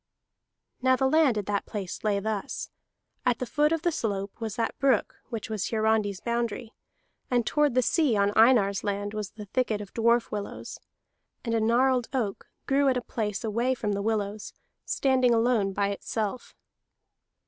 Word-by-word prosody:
Now 260 0 +4
the 265 +1 +2
land 285 -5 +4
at 205 - -2
that 205 -1 -2
place 200 -5 -5
lay 205 -2 +1
thus. 210 -1 -4 0.5
At 250 -3 +2
the 255 - -3
foot 300 +4 +2
of 330 -1 0
the 345 - +2
slope 200 -7 -3
was 220 -2 -3
that 230 - -2
brook 275 -1 +2
which 225 -4 -4
was 215 -3 -2
Hiarandi's 215 -3 +1
boundary, 235 0 -3 0.6
and 245 -2 +2
toward 295 -1 +2
the 255 - +4
sea 280 -5 +2
on 200 +1 +2
Einar's 220 -4 +4
land 205 0 -2
was 210 -2 -4
the 210 -1 -10
thicket 220 0 -1
of 205 -2 -9
dwarf 235 +1 +2
willows. 205 -1 -6 0.7
And 230 - -1
a 225 - +2
gnarled 245 +2 +3
oak 220 -7 -2 0.2
grew 280 0 +2
at 255 - +2
a - - -1
place 215 -3 -3
away 235 +4 0
from 210 -4 -2
the 200 0 -1
willows, 210 -1 -2 0.3
standing 255 -3 +2
alone 225 -4 +2
by 200 +1 0
itself. 215 +3 -4
225 Hz, 170 wpm, -27 LUFS, 205-250 Hz, 0.7 s, Now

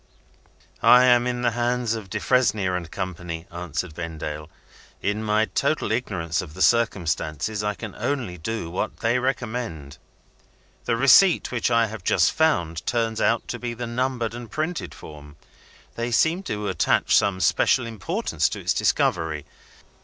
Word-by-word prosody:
"I 125 +1 +7
am 120 -1 +4
in 125 0 -2
the 120 - +2
hands 120 0 0
of 110 -4 -6
Defresnier 100 -6 +1
and 85 -2 -4
Company," 90 -2 -5
answered 85 -1 -4
Vendale. 75 -2 -6 0.5
"In 105 +2 -2
my 110 0 +2
total 140 -2 -1
ignorance 95 -8 -1
of 80 -3 -10
the - - -7
circumstances, 100 -3 0
I 105 0 -1
can 110 -2 -7
only 125 -11 -3
do 90 -1 -4
what 90 - -4
they 115 +2 +2
recommend. 120 - -4 0.9
The 115 - +1
receipt 160 +8 +5
which 125 -1 0
I 115 -1 +3
have 110 -3 -8
just - - +3
found, 85 - +1
turns 115 -2 0
out 115 0 +1
to - - -4
be 120 -1 -4
the 120 +1 -4
numbered 120 -1 -2
and 120 -1 -8
printed 155 - -3
form. 75 -1 -12 0.6
They 115 +1 -3
seem 160 +10 +2
to 105 0 -3
attach 90 -4 +2
some 100 -2 +2
special 125 +5 +3
importance 110 -6 -1
to - - -5
its - - 0
discovery. 80 -4 0
110 Hz, 155 wpm, -24 LUFS, 85-120 Hz, 0.9 s, I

